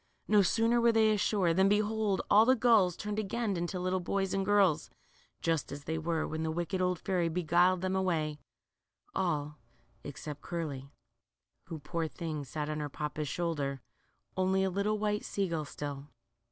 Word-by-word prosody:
No 210 -1 +5
sooner 230 +5 +2
were 235 0 +5
they 220 -1 +4
ashore, 195 -4 +2
than 190 +3 +4
behold, 210 -1 +1
all 210 +2 +7
the 255 +3 +5
gulls 220 -8 +4
turned 210 0 -3
again 215 0 -1
into 175 +1 -3
little 185 +1 0
boys 195 +1 -1
and 195 - 0
girls, 195 -5 +3 0.5
just 165 -2 0
as 140 0 -7
they 160 +2 -2
were 165 0 -1
when 160 0 -4
the 160 - -1
wicked 175 +3 -2
old 180 -1 +1
fairy 180 -2 0
beguiled 175 +2 +2
them 185 0 -1
away, 160 -5 0 0.7
all 150 -5 -1 0.4
except 145 +1 -7
Curly, 145 -6 -5 0.8
who, 165 -2 -5
poor 165 +2 -3
thing, 155 -2 -5
sat 150 +3 -4
on 155 0 -3
her 150 -1 -3
papa's 150 +1 -4
shoulder, 145 -5 -2 0.6
only 190 +1 +2
a 190 - 0
little 200 +3 0
white 210 0 -1
sea 200 -1 -1
gull 165 -3 -2
still. 145 -1 -6
180 Hz, 170 wpm, -31 LUFS, 155-200 Hz, 0.8 s, all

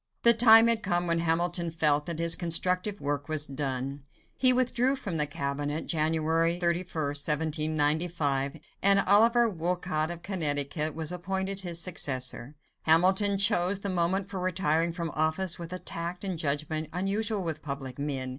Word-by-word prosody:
The 235 - +9
time 225 -1 +7
had 230 -1 +1
come 175 -2 0
when 170 -1 0
Hamilton 170 +1 0
felt 150 -2 0
that 170 -2 -3
his 165 0 +2
constructive 180 +4 0
work 145 +1 -4
was 155 -1 +1
done. 135 0 -4 0.3
He 255 -1 +6
withdrew 255 +1 +1
from 195 -10 -5
the 150 -1 +2
cabinet 145 +2 -4
(January 160 +1 0
31, 175 +1 0 0.2
1795), 150 0 -1 0.2
and 200 0 +5
Oliver 230 +5 +4
Wolcott 175 -4 -2
of 175 0 -7
Connecticut 150 -4 0
was 160 0 -2
appointed 190 +2 -2
his 175 -3 -1
successor. 135 -6 -2 0.3
Hamilton 190 +5 +4
chose 195 -1 +2
the 200 - -3
moment 185 +2 -1
for 195 -1 -6
retiring 170 -3 0
from 165 -2 -5
office 160 +4 -1
with 170 0 -8
a 185 - -4
tact 175 0 -6
and 185 -4 -4
judgment 155 +1 -2
unusual 200 +3 -2
with 160 -3 -4
public 140 -2 -7
men. 135 -3 -3
170 Hz, 155 wpm, -27 LUFS, 150-190 Hz, 0.3 s, The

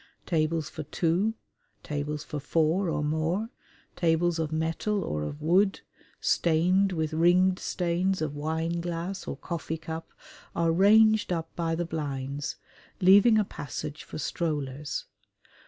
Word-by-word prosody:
Tables 160 -2 0
for 155 - -6
two, 175 +8 0 0.5
tables 150 0 -3
for 150 - -5
four 165 +5 +1
or 150 - -1
more, 160 +8 0 0.5
tables 170 0 +2
of 160 -1 -1
metal 165 +6 -1
or 75 0 -2
of 75 - -5
wood, 190 +5 +3 0.4
stained 180 +4 +2
with 160 -3 -2
ringed 180 +3 +4
stains 180 +2 0
of 155 -2 -2
wineglass 170 +4 -3
or - - -4
coffee 165 -2 -4
cup 160 +1 -7 0.4
are 165 -1 +2
ranged 215 +4 +5
up 165 -2 -3
by 165 -1 -1
the 175 +1 -1
blinds, 140 -3 -4 0.4
leaving 205 +5 +7
a 215 - +4
passage 145 -2 -6
for - - -8
strollers. 150 -3 -3
165 Hz, 130 wpm, -28 LUFS, 155-185 Hz, 0.5 s, leaving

